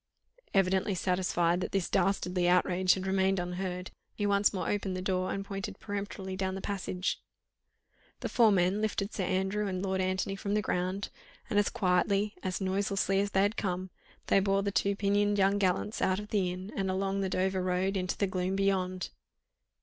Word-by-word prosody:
Evidently 190 +1 +2
satisfied 180 -1 +1
that - - -4
this 195 -3 +1
dastardly 180 -2 +1
outrage 180 +1 +3
had 190 0 -4
remained 190 0 +2
unheard, 180 +1 -4 0.2
he 205 - -1
once 200 0 +3
more 190 - -3
opened 195 -2 -1
the - - -3
door 185 -1 0
and 195 0 -3
pointed 195 0 -5
peremptorily 200 -2 -5
down 190 0 -2
the - - -4
passage. 190 -2 -2 1.0
The - - -1
four 230 -3 +4
men 190 +2 +2
lifted 210 -1 -1
Sir 190 - -1
Andrew 190 +3 0
and 185 -1 -2
Lord 190 -1 0
Antony 185 +1 -1
from 200 +1 -2
the 210 - +2
ground, 185 +2 -1 0.4
and 205 - +4
as 205 - +2
quietly, 195 +2 +1
as 185 -1 -2
noiselessly 195 0 +1
as 200 0 +1
they 195 -1 +3
had 205 +3 0
come, 185 -1 -2 0.3
they - - +4
bore 195 0 +1
the 200 - 0
two 200 0 +1
pinioned 205 +1 +2
young 195 +1 +3
gallants 195 +3 0
out 185 0 +2
of 210 0 -8
the 190 -4 +1
inn 185 +3 -7
and 195 -1 -1
along 195 +1 0
the 190 - 0
Dover 190 0 0
Road 185 +2 0
into 185 -1 -1
the 200 - +2
gloom 185 0 -1
beyond. 185 -2 0
190 Hz, 190 wpm, -30 LUFS, 185-200 Hz, 1.0 s, four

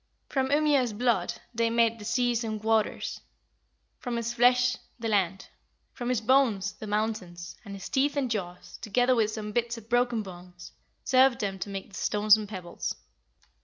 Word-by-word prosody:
From 265 -1 0
Ymir's 285 -5 +3
blood 240 +2 +1 0.2
they 230 0 +1
made 230 0 +2
the 210 - -9
seas 240 +1 +1
and 215 -1 -4
waters; 220 -1 0 0.8
from 245 -2 -4
his 235 0 -2
flesh 250 +1 +4 0.2
the 230 -1 -4
land; 195 -3 0 0.5
from 245 -1 -4
his 250 -3 +1
bones 225 -5 +2
the 215 - -9
mountains; 205 -5 -3
and 200 -3 -8
his 195 - -7
teeth 285 +2 +1
and 260 -4 0
jaws, 180 -4 -5
together 245 +4 +2
with 225 -3 +2
some 215 -1 -5
bits 235 +1 -1
of 225 0 -12
broken 245 -2 +2
bones, 180 -1 -11 0.3
served 260 -1 +4
them 195 -2 -3
to 185 - -4
make 195 0 -6
the - - -23
stones 210 0 +4
and 215 -2 -5
pebbles." 185 -4 -5
225 Hz, 170 wpm, -28 LUFS, 205-245 Hz, 0.8 s, flesh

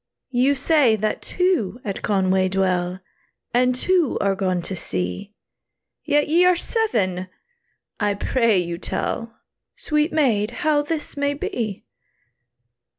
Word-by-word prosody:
"You 260 +3 +3
say 280 -4 +3
that 215 0 -2
two 355 - 0
at 200 -2 -4
Conway 190 -2 +1
dwell, 185 -1 0 0.5
And 250 +1 +3
two 345 +2 +2
are 200 -1 +1
gone 185 -2 -1
to 190 - -4
sea, 90 - -3 0.7
Yet 295 -1 +2
ye 335 +4 +4
are 360 0 +5
seven! 210 - -1 0.7
I 205 -2 +1
pray 230 0 +2
you 170 -1 -2
tell, 230 +4 -3 0.4
Sweet 300 +2 0
maid, 235 -9 +2 0.2
how 300 -1 +3
this 300 +1 -4
may 285 0 0
be." 220 -7 -4
225 Hz, 125 wpm, -22 LUFS, 190-295 Hz, 0.7 s, are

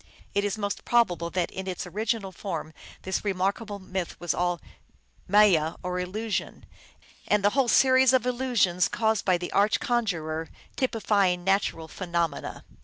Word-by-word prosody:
It 200 - +1
is 205 0 -1
most 200 -1 -3
probable 180 -8 +2
that 175 0 -1
in 190 0 -6
its 185 0 -4
original 210 +2 -2
form 165 -4 -5 0.3
this 190 - -2
remarkable 200 +2 -1
myth 185 -2 -5
was 175 - -1
all 175 -1 0 0.7
maya, 180 -6 +4
or 180 0 -2
illusion, 210 +5 -3 0.6
and 210 -1 +2
the 205 - +5
whole 270 +1 +2
a - - 0
series 260 0 +5
of 260 -2 +3
illusions, 240 -8 +2
caused 220 -2 0
by 185 -2 +3
the 175 0 -6
arch 205 +1 +3
conjurer, 165 -10 -1 0.3
typifying 200 -7 +1
natural 190 -4 0
phenomena. 170 -1 -3
195 Hz, 150 wpm, -27 LUFS, 175-220 Hz, 0.7 s, the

